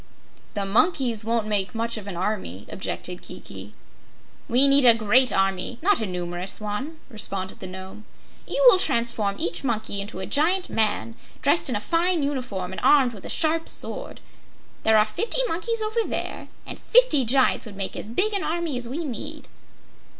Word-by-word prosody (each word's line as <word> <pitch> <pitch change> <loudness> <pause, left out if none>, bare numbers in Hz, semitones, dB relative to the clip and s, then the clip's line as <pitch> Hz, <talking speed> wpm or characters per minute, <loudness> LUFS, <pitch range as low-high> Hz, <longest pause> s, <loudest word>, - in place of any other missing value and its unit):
"The 200 -1 -2
monkeys 235 - +2
won't 230 0 0
make 205 -1 -1
much 230 +1 -2
of 210 -3 -7
an 185 -4 -6
army," 180 - -3
objected 180 -1 -5
Kiki. - - -10 0.8
"We 255 +4 +5
need 275 0 +5
a 235 -2 +7
great 235 +4 +3
army, 195 +4 -1
but 350 - -7
not 410 - +4
a 220 - -2
numerous 180 0 -4
one," 215 +10 -5
responded 200 -5 -3
the 190 - -7
Nome. 190 +3 -10 0.4
"You - - +1
will 440 -7 +8
transform 235 - +2
each 170 +6 -2
monkey 220 -5 -1
into 200 -1 -6
a 190 - -4
giant 355 - +1
man, 115 - 0 0.3
dressed 285 +1 +3
in 245 - -1
a - - 0
fine 335 - 0
uniform 250 -10 -3
and 190 - -6
armed 265 -5 +5
with 205 - -10
a - - -9
sharp 325 0 +2
sword. - - -2 0.6
There 220 0 +4
are 210 - +5
fifty 400 - 0
monkeys 450 +5 -1
over 435 +2 -1
there - - -5 0.2
and - - -8
fifty 465 - +4
giants 255 0 +3
would 205 - -10
make 195 -1 -4
as 210 - -6
big 390 - +1
an 395 - -1
army 325 -5 -2
as 240 -1 -6
we 320 +6 -4
need." 250 -6 -6
230 Hz, 180 wpm, -24 LUFS, 200-310 Hz, 0.8 s, will